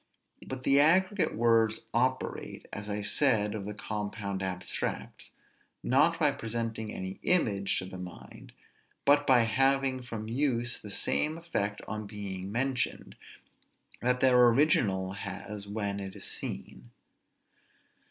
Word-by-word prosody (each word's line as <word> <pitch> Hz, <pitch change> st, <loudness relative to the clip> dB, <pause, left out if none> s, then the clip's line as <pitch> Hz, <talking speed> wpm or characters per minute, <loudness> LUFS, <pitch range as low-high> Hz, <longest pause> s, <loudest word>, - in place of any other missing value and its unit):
But 130 Hz, -1 st, -6 dB
the 140 Hz, +1 st, +4 dB
aggregate 185 Hz, +6 st, +3 dB
words 115 Hz, -1 st, +3 dB
operate, 130 Hz, +2 st, -1 dB
as 100 Hz, +1 st, -5 dB
I 105 Hz, 0 st, -2 dB
said 105 Hz, -3 st, +3 dB
of 105 Hz, -3 st, -5 dB
the 105 Hz, 0 st, -5 dB
compound 100 Hz, -1 st, -4 dB
abstracts, 90 Hz, -1 st, -4 dB, 0.5 s
not 155 Hz, +6 st, +3 dB
by 150 Hz, -3 st, +4 dB
presenting 115 Hz, -4 st, -4 dB
any 95 Hz, +1 st, -6 dB
image 100 Hz, -, +2 dB
to 95 Hz, -, -3 dB
the 95 Hz, 0 st, -8 dB
mind, 90 Hz, -1 st, -10 dB, 0.5 s
but 145 Hz, +1 st, +4 dB
by 125 Hz, -2 st, +6 dB
having 135 Hz, +2 st, +2 dB
from 115 Hz, -3 st, -6 dB
use 120 Hz, -1 st, 0 dB
the 105 Hz, -, -9 dB
same 155 Hz, +9 st, +1 dB
effect 105 Hz, -12 st, -3 dB
on 105 Hz, 0 st, -5 dB
being 100 Hz, -2 st, -6 dB
mentioned, 125 Hz, +1 st, -2 dB, 0.9 s
that 125 Hz, +1 st, +1 dB
their 125 Hz, -2 st, +6 dB
original 115 Hz, -8 st, +2 dB
has 100 Hz, +1 st, -6 dB
when 100 Hz, -1 st, -3 dB
it 95 Hz, 0 st, -7 dB
is 100 Hz, -, -6 dB
seen. -, -, -5 dB
110 Hz, 130 wpm, -30 LUFS, 100-130 Hz, 0.9 s, by